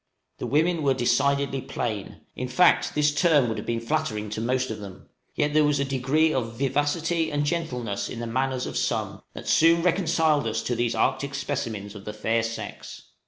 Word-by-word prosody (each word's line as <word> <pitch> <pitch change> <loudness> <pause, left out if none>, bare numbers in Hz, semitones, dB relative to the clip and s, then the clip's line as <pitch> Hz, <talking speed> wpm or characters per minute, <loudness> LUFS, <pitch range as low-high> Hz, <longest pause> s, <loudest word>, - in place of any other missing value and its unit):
The - - -3
women 160 +3 +2
were 135 -2 +2
decidedly 140 +2 +1
plain; 110 -6 -4
in 125 - -3
fact, 170 +8 +3
this 150 0 +3
term 150 -4 +4
would 110 - -2
have - - -8
been 115 0 0
flattering 105 -2 -2
to 110 - -3
most 130 +1 0
of 110 - -5
them; 100 -3 -11 0.3
yet 150 0 0
there 155 0 +5
was 145 -1 +2
a 140 - +1
degree 135 +4 +1
of 115 -3 -2
vivacity 150 +5 0
and 145 0 0
gentleness 125 -10 -2
in - - -6
the 120 - -3
manners 130 +2 -1
of - - -4
some - - -1
that - - -8
soon 165 +1 +5
reconciled 165 -6 +2
us 110 0 -2
to 120 - -1
these 120 0 0
Arctic 140 0 0
specimens 110 -8 -3
of 100 -2 -11
the 105 - -5
fair 115 +2 0
sex. 115 +1 -7
135 Hz, 195 wpm, -25 LUFS, 115-150 Hz, 0.3 s, there